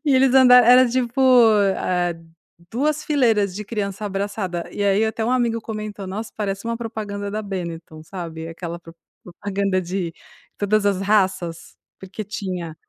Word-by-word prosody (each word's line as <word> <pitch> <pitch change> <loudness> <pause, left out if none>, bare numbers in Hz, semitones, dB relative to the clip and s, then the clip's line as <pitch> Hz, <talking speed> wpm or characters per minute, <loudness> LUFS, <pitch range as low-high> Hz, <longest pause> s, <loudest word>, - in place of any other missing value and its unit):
E 285 -3 +3
eles 260 0 +4
anda 260 -2 +7
era 250 +1 +6
tipo, 245 +1 -1 0.6
eh, 175 -1 -1 0.6
2 300 +5 -1
fileiras 225 -10 +2
de 210 - -5
criança 205 -1 -4
abraçada 195 -3 -3
e 205 - -3
aí 200 +2 +3
até 220 0 -2
um 240 - 0
amigo 235 -2 +1
comentou: 215 -3 -6
"Nossa! 215 +4 -6
Parece 200 -1 -3
uma 230 0 -2
propaganda 210 -3 -5
da 215 +1 -3
Beniton." 170 -5 -6
Sabe? 165 -2 -7
Aquela 170 +1 -6
prop 165 -1 -15 0.3
propaganda 195 +1 -2
de 175 -1 -3 0.4
todas 205 0 +1
as 195 -2 +1
raças, 190 -5 0 0.2
porque 190 +3 -7
tinha 185 -5 -5
200 Hz, 155 wpm, -22 LUFS, 185-225 Hz, 0.6 s, anda